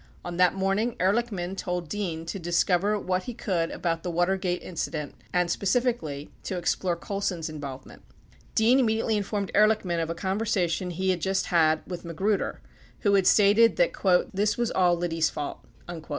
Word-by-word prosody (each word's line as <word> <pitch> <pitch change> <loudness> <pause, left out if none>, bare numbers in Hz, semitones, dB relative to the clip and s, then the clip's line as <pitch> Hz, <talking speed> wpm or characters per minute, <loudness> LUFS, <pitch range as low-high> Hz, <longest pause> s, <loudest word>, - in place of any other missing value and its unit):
On 175 -1 -5
that 180 0 +4
morning, 195 +5 0
Ehr 190 +2 +3
lichman 200 -6 -2
told 180 -3 -3
Dean 165 -3 -3
to 180 +4 -5
discover 180 +4 +1
what 185 -1 -1
he 245 - -6
could 170 -7 -1
about 165 -1 -2
the 175 - -3
W 175 +1 +2
atergate 180 -2 -1
in - - -9
cident 155 -3 -3 0.2
and, 180 -1 +1
specifically, 195 - -1
to 185 - -4
explore 175 0 0
Colson's 180 -3 -3
involvement. 140 -4 -8 0.5
Dean 235 +4 +5
imme 220 -4 +2
diately 225 -1 0
informed 205 -1 -2
Ehrlichman 210 -5 +3
of 165 - -3
a 165 - -2
conversation 190 -2 -1
he 185 +2 0
had 175 -2 -2
just 190 +1 0
had 160 -2 +3
with 180 -2 -6
Magruder, 190 +5 -1 0.4
who 205 - +2
had 195 -2 +4
stated 210 +3 +5
that - - +2 0.4
"this 205 +2 +1
was 240 -1 0
all 180 -2 +3
Liddy's 165 -2 0
fault." 145 - -6
185 Hz, 175 wpm, -26 LUFS, 170-205 Hz, 0.5 s, Dean